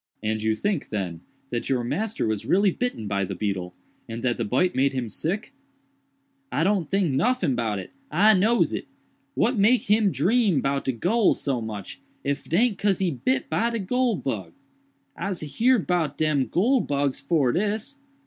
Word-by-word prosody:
"And 110 0 -1
you 110 0 +1
think, 195 - -2
then, 90 -6 -3 0.3
that 120 -1 -3
your 130 -3 +1
master 215 - -2
was 110 -2 -1
really 195 +1 +4
bitten 210 - -3
by 100 -1 0
the 95 - -4
beetle, 95 -4 -3 0.3
and 115 +1 -6
that 125 -1 +1
the 115 - -1
bite 130 - +1
made 135 +1 +2
him 125 -4 -3
sick?" 195 - -3 1.0
"I - - +1
do 195 - +4
n't 175 -7 -2
tink 195 -5 +1
noffin 230 - +1
about 115 -4 -1
it—I 175 - +1
nose 215 +5 +3
it. - - -4 0.5
What 245 +1 +2
make 230 +5 +4
him 210 -2 +4
dream 210 - +2
'bout 140 +1 -1
de 130 - +1
goole 215 - +2
so 135 -4 -2
much, 105 -3 -7 0.2
if 140 +1 -3
'taint 205 +4 +2
cause 200 -3 +2
he 185 -3 0
bit 130 -1 -1
by 220 +9 +1
de 235 - -2
goole 240 +3 +1
bug? 100 - -4 0.6
Ise 185 +1 -3 0.2
heerd 245 -2 +4
'bout 165 -6 0
dem 150 -4 +1
goole 240 +8 +2
bugs 140 -2 -1
fore 140 -2 +2
dis." 215 - -2
155 Hz, 180 wpm, -25 LUFS, -, 1.0 s, really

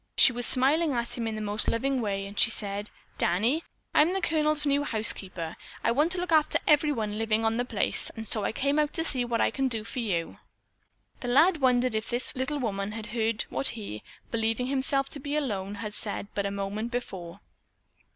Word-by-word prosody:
She - - +9
was 245 -1 -1
smiling 285 +4 +3
at 235 -1 -2
him 230 -2 -3
in 220 -1 -3
a - - -4
most 210 +1 -2
loving 265 +2 +1
way 195 -2 -2
and 200 -1 -5
she - - +7
said: 205 -2 -3 0.3
"Danny, 230 - +2 0.3
I'm 320 +4 +5
the 385 - +1
Colonel's 305 -2 +1
new 285 0 +2
housekeeper. 195 - 0 0.3
I - - +3
want 295 +8 +2
to - - -3
look 355 -1 -3
after 310 -2 +4
everyone 265 -9 +2
living 225 0 +1
on 225 +1 +1
the 245 - 0
place, 220 -5 +1
and 225 -1 -6
so 215 - -1
I - - 0
came 280 +5 +1
out 300 -1 +1
to 325 - -1
see 260 -6 +3
what 235 -1 0
I - - +3
can 270 -1 0
do 225 -4 -3
for 250 - -6
you." 180 -8 -2 0.8
The 245 - -6
lad 320 +8 +5
wondered 250 -1 +3
if 220 0 -2
this 245 +1 -1
little 265 +3 -1
woman 205 -5 -2
had 220 -1 -6
heard 225 -1 0
what 275 - +2
he, 155 - -6 0.3
believing 225 +1 0
himself 275 +1 +1
to 285 - -6
be 285 +2 -3
alone, 205 -9 -2
had 210 0 -6
said 205 -1 -4
but 200 -1 -1
a - - -3
moment 200 +3 -3
before. 195 -7 -5
235 Hz, 210 wpm, -28 LUFS, 210-275 Hz, 0.8 s, She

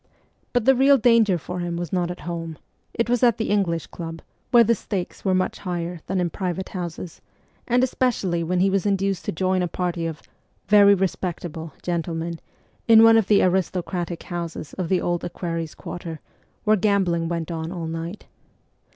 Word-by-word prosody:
But 245 -3 +1
the 265 - +7
real 270 +2 +5
danger 230 -5 +4
for 180 +3 -6
him 175 -1 -3
was 175 0 -5
not 175 -2 0
at 175 - -6
home: 165 -2 -5 0.3
it 230 - -1
was 245 0 +1
at 240 -3 +4
the 220 - -2
English 175 -6 +1
Club, 165 -1 -8 0.3
where 240 -1 +7
the 230 +1 +3
stakes 195 -4 -5
were 190 -2 +2
much 185 0 -1
higher 175 -2 -4
than 190 +1 -1
in 175 -2 0
private 185 -1 -3
houses, 175 -2 -6 0.5
and 245 +1 +3
especially 210 -10 0
when 180 +2 0
he 195 - +4
was 195 +1 +1
induced 195 -2 0
to - - -1
join 185 +2 0
a 180 - 0
party 175 -1 -2
of 160 -1 -7 0.2
' - - -42
very 200 -1 +8
respect 185 -2 -2
able 160 -2 -7
' - - -45
gentlemen, 170 -1 -3 0.5
in 225 -1 +8
one 225 0 +8
of 220 -4 +3
the 205 -1 +5
aristocratic 180 -1 -1
houses 170 -3 -6
of 180 -3 -4
the 185 - +3
Old 175 -1 -1
Equerries' 165 -2 -4
Quarter, 165 -2 -7 0.4
where 215 0 +4
gambling 185 -4 +1
went 170 0 -3
on 165 0 -4
all 175 -3 -4
night. 165 +5 -5
180 Hz, 190 wpm, -23 LUFS, 170-200 Hz, 0.5 s, very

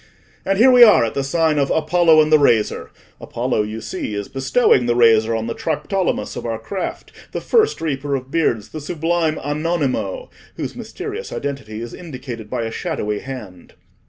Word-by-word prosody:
And 195 0 0
here 250 +5 +6
we 250 -1 +6
are 210 - +8
at 115 - -4
the 140 - -1
sign 155 +2 +1
of 140 - +1
'Apollo 160 0 +4
and 155 - -3
the 155 - +7
Razor.' 115 -7 +2 0.3
Apollo, - - -2
you 105 +1 -5
see, 105 - -5
is 100 -1 -5
bestowing 135 - +2
the 120 - +2
razor 115 -1 +4
on 110 0 -2
the 115 - -3
Triptolemus 165 +4 -2
of - - -5
our 115 -1 -3
craft, 185 - -5 0.2
the - - -2
first 445 -2 +2
reaper 145 -3 -2
of 130 0 -6
beards, 115 -10 0
the 155 - -7
sublime 165 0 -1
Anonimo, 155 - -2 0.2
whose - - -5
mysterious 435 +3 -7
identity 125 -6 -5
is 120 - -8
indicated 125 -9 -8
by 115 - -2
a 115 - -4
shadowy 105 -2 -3
hand." 105 -10 -9
140 Hz, 180 wpm, -20 LUFS, 115-165 Hz, 0.3 s, are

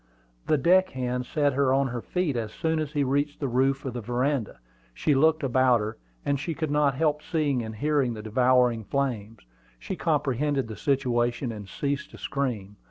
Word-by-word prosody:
The 155 - +3
deck 185 +6 +4
hand 125 -1 -3
set 145 -2 +1
her 135 -1 +2
on 135 0 +2
her 120 -1 -4
feet 180 -3 -1
as 110 -3 -3
soon 160 +3 -1
as 150 -1 -3
he 145 -2 +1
reached 145 +2 0
the 140 - -1
roof 135 +3 +1
of 130 - -3
the 120 - -4
veranda. 125 +1 -1 0.4
She 145 - +1
looked 155 +3 +3
about 130 -2 +3
her, 105 +1 -4 0.3
and 140 -1 +1
she 160 +3 -3
could 155 -2 -2
not 145 -2 +2
help 150 +1 +1
seeing 150 -5 0
and 110 -1 -6
hearing 140 -1 +1
the 105 - -8
devouring 125 0 +3
flames. 115 -4 -2 0.4
She - - -5
comprehended 135 0 0
the 110 - -7
situation, 120 0 0
and 105 -3 -8
ceased 140 +6 -3
to - - -13
scream. 110 -8 -3
135 Hz, 190 wpm, -26 LUFS, 120-145 Hz, 0.4 s, deck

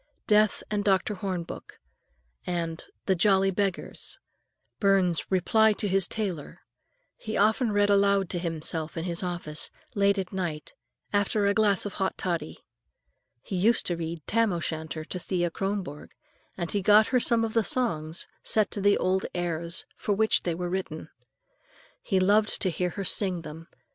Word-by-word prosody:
"Death 215 0 +3
and 205 -1 0
Dr. 195 +1 +2
Hornbook" 185 -3 -5 0.7
and 170 -2 -3 0.2
"The 190 - +3
Jolly 195 +1 +3
Beggars," 195 -1 -2 0.6
Burns's 190 -4 +2
"Reply 215 +4 +4
to 205 - -3
his 195 -1 +3
Tailor," 185 -9 -4 0.6
he 220 -1 -4
often 220 +3 +3
read 205 0 +3
aloud 200 -1 +3
to 175 - -2
himself 165 -1 -3
in 165 - -2
his 170 -1 -2
office, 175 -4 -4 0.2
late 200 0 +3
at 190 -1 -4
night, 170 -5 -4 0.4
after 205 +1 +1
a 200 - +3
glass 205 -2 +2
of 205 - -4
hot 190 - -2
toddy. 170 - -3 0.8
He 195 - -5
used 220 +6 +3
to 175 - 0
read 165 -2 -5
"Tam 230 -1 +2
o'Shanter" 160 -2 -4
to 180 - -5
Thea 175 -1 -1
Kronborg, 195 -6 -4 0.4
and 170 -3 -3
he 205 - 0
got 210 +3 +6
her 255 - +3
some 230 -1 +3
of 220 - -5
the 225 - +3
songs, 165 -10 0
set 215 -2 +2
to 205 - -3
the 205 +1 +4
old 190 +1 0
airs 170 -1 -2
for 205 - -1
which 220 +2 +3
they 170 -2 -2
were 175 +1 -3
written. 175 -3 -4 0.9
He 190 -3 +1
loved 210 +3 +3
to 185 - +1
hear 180 +2 -1
her 195 +2 -5
sing 180 -3 +1
them. 160 +2 -9
190 Hz, 165 wpm, -27 LUFS, 170-205 Hz, 0.9 s, got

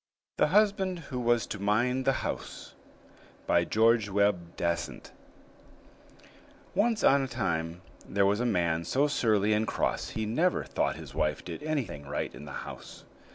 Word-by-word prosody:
THE - - +5
HUSBAND 195 0 +2 0.2
WHO 125 - -1
WAS 120 -1 +2
TO 100 - -6
MIND 120 +6 +1
THE 135 - +5
HOUSE - - -5 0.7
BY 85 - +3
GEORGE 110 0 +3
WEBBE 100 -4 0
DASENT 85 -1 -3 1.6
Once 215 +2 +1
on 140 +1 +5
a 135 - -2
time 85 -8 -2 0.3
there 100 0 +2
was 100 +2 +2
a 125 - 0
man 85 -6 +1
so 135 - +1
surly 110 -7 +2
and 110 +1 +1
cross - - -1
he 110 - -3
never 160 +12 +1
thought - - -1
his - - -10
wife 75 -1 -1
did - - -6
anything 120 - -3
right 75 - -3
in 75 - -10
the 70 - -9
house. - - -10
110 Hz, 155 wpm, -29 LUFS, 85-135 Hz, 1.6 s, THE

